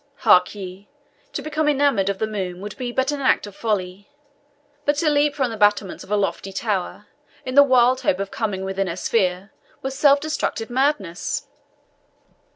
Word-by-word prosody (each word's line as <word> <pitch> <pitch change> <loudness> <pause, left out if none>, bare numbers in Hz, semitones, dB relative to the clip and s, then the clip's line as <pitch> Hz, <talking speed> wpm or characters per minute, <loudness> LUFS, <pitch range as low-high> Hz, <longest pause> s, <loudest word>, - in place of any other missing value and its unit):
Hark 185 -2 +5
ye 190 0 -9 0.4
to - - -5
become 310 0 -1
enamoured 275 -9 +2
of 200 - -1
the 220 - 0
moon 190 -4 -4
would 205 +1 -7
be 250 -2 -4
but 260 +3 0
an 290 -1 -4
act 260 - +2
of 205 -1 -11
folly; 200 -3 -3 0.7
but 290 0 +2
to 305 +1 +1
leap 290 0 +2
from 260 -4 0
the 225 - -6
battlements 205 -2 +1
of - - -16
a 210 - +1
lofty 195 -1 -2
tower, 200 -1 -3 0.4
in 255 - -4
the 285 - +8
wild 255 -2 +4
hope 185 - +1
of 195 0 -4
coming 195 -4 -3
within 195 0 -2
her 170 - -3
sphere, 185 -1 0 0.3
were 265 - -2
self 280 +1 +4
destructive 280 -6 -3
madness." 245 - -1
215 Hz, 180 wpm, -22 LUFS, 195-270 Hz, 0.7 s, the